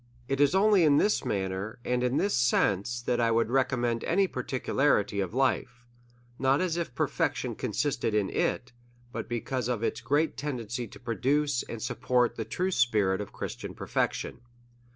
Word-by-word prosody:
It 135 +1 0
is 145 +5 +4
only 200 -2 +5
in 145 -2 +5
this 210 - +2
manner, 95 +1 -2
and 125 0 0
in 125 +2 +1
this 200 +1 +1
sense, 120 -1 +1
that 120 0 0
I 115 - +3
Avould 115 0 +2
recommend 120 -2 +1
any 195 +4 +3
particularity 130 - 0
of 95 +3 -2
life; 125 -2 0 0.5
not 135 +2 +3
as 180 -3 0
if 170 -7 -3
perfection - - -1
con - - -4
sisted 110 - 0
in 105 -2 +1
it, - - -1 0.4
but 115 -2 -5
because 120 +1 -2
of 120 -3 -1
its 115 +1 -1
great 145 +6 +1
tendency 125 -4 -4
to - - -13
produce 135 +3 0
and 115 -2 -7
support 125 0 +1
the 110 - -4
true 180 - -1
spirit 105 - +2
of 105 - -7
Christian - - -6
per - - -7
fection. - - -1
125 Hz, 170 wpm, -28 LUFS, 115-140 Hz, 0.5 s, only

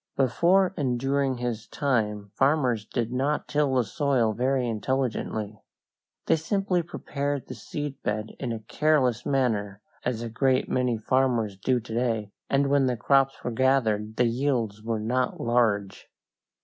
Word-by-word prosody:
Before 175 +9 +3
and 125 -4 0
during 135 0 0
his 120 -3 -3
time 105 -7 -1
farmers 130 -5 +2
did 120 0 -2
not 140 +4 0
till 145 -3 +1
the 125 - +3
soil 125 -2 +1
very 130 +2 0
intelligently. 110 -3 -2 0.6
They - - +3
simply 180 +2 0
prepared 145 -4 -3
the - - -7
seed 145 +6 -6
bed 105 +1 -2
in 125 -3 -3
a 115 -1 -4
careless 135 -1 +1
manner, 110 -7 0 0.2
as 120 -2 -2
a 115 - -4
great 130 +2 +2
many 125 -2 0
farmers 115 -3 +1
do 125 +6 +1
to 110 -1 -9
day, 115 -3 -1 0.2
and 140 +1 +3
when 140 -2 +4
the 125 -2 0
crops 135 +2 +2
were 125 - -2
gathered 110 -4 +1
the 125 - +3
yields 115 -4 0
were 110 0 -2
not 125 +4 -1
large. 110 -5 0
125 Hz, 150 wpm, -26 LUFS, 110-135 Hz, 0.6 s, when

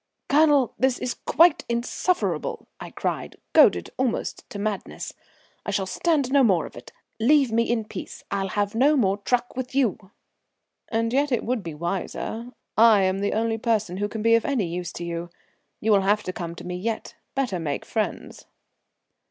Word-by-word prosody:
"Colonel, 290 -4 +4
this 260 +1 +2
is 250 - -2
quite 335 -1 +3
insufferable," 365 - -1
I - - -7
cried, - - -3 0.2
goaded - - +5
almost 255 -3 -2
to - - -7
madness. 205 -1 -4 0.5
"I - - -5
shall 200 -2 0
stand 285 - 0
no 280 -1 +5
more 185 -9 +3
of - - -11
it. 120 - -11 0.3
Leave 270 +2 +4
me 230 +1 +1
in 230 -2 0
peace, - - -8
I'll 195 -1 -1
have 205 +1 -1
no 280 +6 +4
more 200 -5 +2
truck 245 +4 -1
with 255 0 -5
you." 220 -7 0 0.8
"And 230 0 0
yet 280 +1 +2
it 245 - +1
would 245 -1 -1
be 165 -4 -7
wiser. 195 +7 -4 0.3
I 220 -3 +6
am 190 +1 +1
the 200 0 0
only 225 0 0
person 215 -5 0
who 205 +1 -1
can 215 0 -5
be 230 0 +5
of 230 -1 +4
any 255 -8 0
use 175 +1 -4
to 175 - -6
you. 170 0 -4 0.5
You 220 - +1
will 200 -2 +5
have 205 +2 +2
to 185 - -4
come 170 -2 -5
to - - -10
me 180 0 -4
yet. 220 +4 -3 0.2
Better 250 -10 -1
make 150 -4 -3
friends." 220 -2 -3
225 Hz, 185 wpm, -25 LUFS, 195-250 Hz, 0.8 s, I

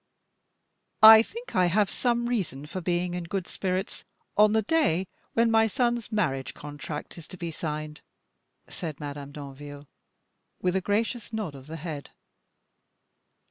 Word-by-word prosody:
"I 220 0 +12
think 470 - -8
I 180 -1 +4
have 200 +4 +3
some 240 +1 0
reason 180 - -2
for 185 +5 -5
being 175 0 0
in 175 -1 -3
good 185 +1 -3
spirits 190 +1 -3 0.3
on 210 0 +5
the 220 0 +3
day 205 - +2 0.3
when 230 0 +3
my 225 0 +5
son's 240 -1 0
marriage 135 - -1
contract 150 +2 -7
is 165 - -12
to 185 - -10
be 170 -1 -4
signed," 150 -1 -5 0.7
said 155 -4 -6
Madame 145 -1 -6
Danville, 145 0 -9 0.7
with 180 0 0
a 190 - +2
gracious 220 +4 -1
nod 215 -9 -3
of 135 0 -12
the 160 - -6
head. 150 -3 -6
180 Hz, 145 wpm, -27 LUFS, 150-220 Hz, 0.7 s, I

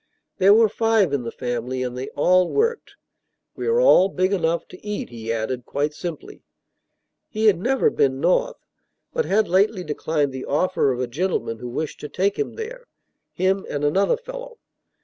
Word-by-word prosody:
There 195 +2 +6
were 225 0 +6
five 220 -6 +2
in 140 - +1
the 115 -1 -5
family, 125 +1 -3
and 125 -1 -4
they 130 +1 -5
all 180 +4 +3
worked. 460 +2 -1 0.6
"We - - -4
are 465 +1 +3
all 195 - +6
big 185 +1 0
enough 170 -3 0
to 180 - -14
eat," 210 0 -4
he 115 -1 -5
added, 115 +3 -2
quite 145 +2 -1
simply. 165 0 -7 0.9
He 220 0 -2
had 200 -6 +5
never 265 +7 +2
been 135 -1 +1
North, - - +1 0.6
but 480 -1 0
had 215 +1 +2
lately 190 +1 +2
declined 150 -2 -1
the 130 0 -6
offer 150 -1 +1
of 125 - -3
a - - +1
gentleman 130 -4 -2
who 125 - -6
wished 150 +5 -4
to 150 - -7
take 195 +2 0
him 430 - -2
there, 480 +2 -8 0.4
him 190 +2 0
and 145 0 -3
"another 195 - +2
fellow." - - -9
185 Hz, 180 wpm, -22 LUFS, 135-220 Hz, 0.9 s, There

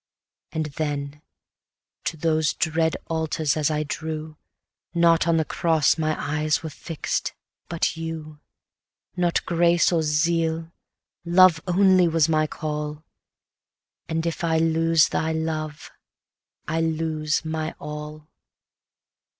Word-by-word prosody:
Yet 155 -3 -4
then, 145 -1 -3 0.8
to 165 - -2
those 155 0 +1
dread 160 0 +1
altars 160 -2 -1
as 155 -1 +1
I 155 0 0
drew, 155 +1 -5 0.6
Not 170 0 +4
on 165 -1 +3
the 160 - +1
cross 160 -2 +2
my 155 -1 0
eyes 150 +2 0
were 160 - -5
fix'd, 160 +2 -3 0.4
but 170 0 0
you: 160 -2 -6 0.8
Not 175 -2 +1
grace, 170 0 +3
or 170 -2 +2
zeal, 160 +1 0 0.5
love 175 -1 +5
only 185 0 +5
was 165 -1 +3
my 155 -1 +2
call, 150 0 -4 1.1
And 160 0 -1
if 170 0 -3
I 165 -1 +2
lose 165 0 +3
thy 160 0 -1
love, 155 -1 -4 0.8
I 160 +1 0
lose 160 -1 -1
my 160 0 -3
all. 150 0 -8
160 Hz, 120 wpm, -24 LUFS, 155-165 Hz, 1.1 s, love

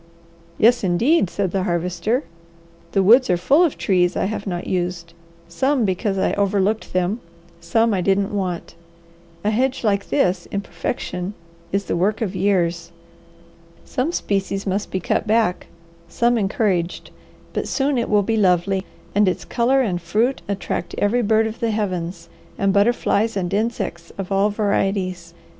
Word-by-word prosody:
"Yes 235 +1 +4
indeed!" 195 - +3
said 195 -2 -2
the 195 - 0
Harvester. 180 - -1 0.7
"The 195 - +3
woods 240 +7 +6
are 180 - +3
full 280 - +4
of 330 - +1
trees 180 -3 +2
I - - +1
have 205 0 -4
not 175 -2 -3
used; 175 -2 -3 0.3
some 260 +8 +1
because 195 +1 -1
I - - +1
overlooked 200 +2 0
them, 185 +5 0 0.4
some 225 -1 +2
I 190 - 0
didn't 195 +2 +1
want. 185 -4 -3 0.7
A 210 - +1
hedge 260 +4 0
like 200 -2 0
this, 185 -10 +1
in 200 - -3
perfection, 190 -3 -4 0.4
is 195 0 0
the - - -1
work 200 +5 +1
of 205 -5 -2
years. 175 -3 0 0.9
Some 260 +6 -1
species 195 - -2
must 200 +1 -1
be 190 - -2
cut 185 - -1
back, 215 -4 +1 0.4
some 240 +1 +2
encouraged, 195 -4 -1 0.4
but - - -2
soon 275 -2 +1
it 235 - -2
will 210 -1 +3
be 225 +2 0
lovely, 190 -1 +2 0.3
and 205 0 +3
its 185 - -1
colour 255 +3 +2
and 180 -6 -2
fruit 220 +10 0
attract 200 -2 -3
every 225 +4 +2
bird 220 0 +3
of 220 +1 -5
the 230 - 0
heavens 180 -5 -3 0.3
and 195 -1 +1
butterflies 220 0 +2
and 180 -1 -2
insects 205 -5 -2
of 195 -1 -5
all 195 +2 +3
varieties. 195 -4 -1
200 Hz, 155 wpm, -21 LUFS, 180-225 Hz, 0.9 s, woods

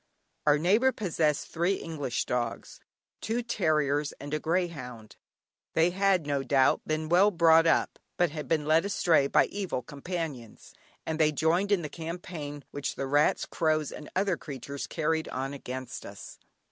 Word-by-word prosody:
Our 150 0 +6
neighbour 210 - +3
possessed 160 - 0
three 175 +4 +1
English 145 -9 -3
dogs, 120 -2 -3 0.4
two 235 +2 -1
terriers 150 -9 0
and 145 +1 -8
a 155 - 0
greyhound. 150 - -3 0.6
They 165 +2 +4
had, 190 -3 +2
no 140 -1 0
doubt, 135 0 +3
been 155 0 -1
well 180 +5 +5
brought 165 -3 +5
up, 165 - +1 0.2
but 175 -3 +2
had 150 -3 -6
been 155 -1 +1
led 155 +2 +4
astray 180 -7 +2
by - - +4
evil 190 -11 -4
companions, 145 -6 -6 0.3
and 160 0 -3
they 155 -1 +4
joined 170 +7 +1
in 190 -4 +2
the - - -3
campaign 160 -3 -7
which 145 - -4
the 135 - -3
rats, 145 +2 +2
crows, 155 -2 0
and 150 - -9
other 190 -2 +1
creatures 140 0 -7
carried 160 0 -1
on 135 +2 -4
against 130 -2 -6
us. - - -10
155 Hz, 160 wpm, -28 LUFS, 145-175 Hz, 0.6 s, Our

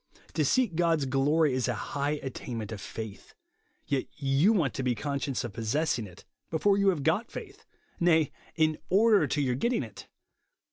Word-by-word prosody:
To - - +1
seek 250 -8 +2
God's 165 -4 +2
glory 140 +3 +2
is 130 -1 0
a - - 0
high 145 +1 -2
at 135 - -4
tainment 115 -4 -5
of 105 -3 -6
faith; 110 -1 -8 0.5
yet 140 -3 0
you 140 +7 +3
want 165 - +1
to - - -3
be 125 -2 +1
con 140 +2 -2
scious 135 -1 -2
of 120 -4 -5
possessing 115 +1 -1
it 90 0 -15 0.2
before 195 +5 +3
you 200 0 +2
have 165 -7 0
got 180 - +1
faith, 420 0 -9 0.2
— - - -34
nay, 160 -4 +3 0.2
in 155 -1 +2
order 210 +2 +5
to 150 - -1
your 130 -3 +1
getting 235 - 0
it 110 -4 -10
145 Hz, 190 wpm, -29 LUFS, 130-175 Hz, 0.5 s, order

